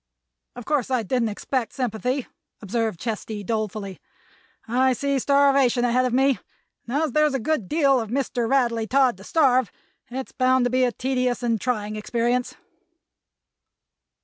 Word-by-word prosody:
"Of 245 -2 -9
course 290 -5 0
I 255 -3 +1
didn't 230 +2 0
expect 235 +3 -3
sympathy," 250 +1 -2 0.3
observed 220 -2 -2
Chesty, 215 -2 -4
dolefully. 215 -3 -3 0.7
"I 255 +3 +2
see 280 +2 -1
starvation 275 -3 +3
ahead 250 +1 +2
of 250 - 0
me, 270 +1 +2 0.5
and 280 +6 0
as 310 - -1
there's 300 0 +2
a - - 0
good 235 -5 -1
deal 280 -4 +3
of 225 -3 -4
Mr. 245 -2 -1
Radley 235 -4 +1
Todd 260 -2 +3
to 195 - -13
starve 255 -3 +2 0.4
it's 260 +2 -6
bound 255 -1 +2
to 245 - 0
be 255 0 +2
a 245 - 0
tedious 250 -1 -1
and 230 -4 0
trying 215 -4 -2
experience." 240 +3 -1
250 Hz, 150 wpm, -24 LUFS, 225-265 Hz, 0.7 s, starvation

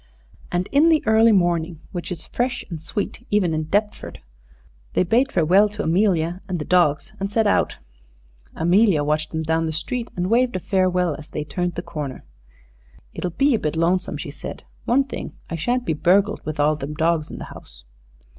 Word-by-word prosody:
And 180 +2 -1
in 295 +4 +5
the 315 -2 +3
early 220 +1 +5
morning, 175 -4 +1
which 175 +1 -5
is 165 -3 -5
fresh 245 +1 -2
and 160 -2 -5
sweet 205 +7 -4
even 190 -5 +2
in 155 0 -1
Deptford, 205 +6 -2 0.7
they - - +3
bade 235 +9 +2
farewell 185 +5 +4
to 210 +1 -5
Amelia 175 -1 +1
and 185 -2 -2
the 150 - -4
dogs 175 +2 +2
and 195 +1 -3
set 225 +1 +2
out. 205 - +1 0.8
Amelia 175 -1 +3
watched 150 +1 0
them 160 0 -3
down 160 +1 0
the - - -2
street 230 +10 -4
and 180 +3 -2
waved 245 +1 +3
a - - 0
farewell 180 -3 +1
as 150 - -12
they 150 - -4
turned 175 +2 -3
the - - -4
corner. 145 -4 -6 0.9
"It'll 180 - -3
be 275 - +2
a 225 - +2
bit 150 +1 -2
lonesome," 170 0 +1
she 145 0 -6
said. 140 - -8 0.2
"One 265 +4 +3
thing, 270 - -7 0.2
I - - -1
shan't 245 +10 -1
be 165 - 0
burgled, 195 +7 +2
with 155 0 -5
all 150 +1 +3
them 150 +1 -6
dogs 160 -1 +1
in - - -8
the - - -7
house." - - -15
180 Hz, 195 wpm, -22 LUFS, 160-210 Hz, 0.9 s, in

